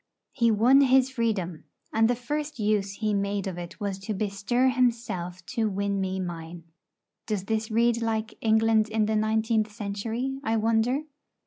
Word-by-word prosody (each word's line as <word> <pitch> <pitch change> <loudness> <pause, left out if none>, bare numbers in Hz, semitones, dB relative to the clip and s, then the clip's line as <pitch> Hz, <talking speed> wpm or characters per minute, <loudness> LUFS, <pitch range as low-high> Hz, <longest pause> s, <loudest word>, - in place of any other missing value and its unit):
He 235 -1 +2
won 240 +6 +5
his 265 -1 +4
freedom; 205 -9 -2 0.3
and 225 +1 +4
the 245 - +2
first 295 +5 -4
use 205 -2 0
he 215 +1 -1
made 200 0 -1
of 185 -2 -4
it 175 +4 -8
was 200 -2 -3
to 205 +2 -4
bestir 210 +5 +1
himself 230 -9 -1
to 220 -2 -1
win 200 0 -1
me 190 0 -2
mine. 170 -1 -6 0.6
Does 210 -4 -1
this 220 +2 -2
read 235 +1 +2
like 225 -1 -1
'England 220 -1 +3
in 220 -1 +1
the 220 +1 0
nineteenth 220 0 +1
century,' 225 +5 -3
I 225 -2 +1
wonder? 230 +5 +1
220 Hz, 160 wpm, -27 LUFS, 200-235 Hz, 0.6 s, won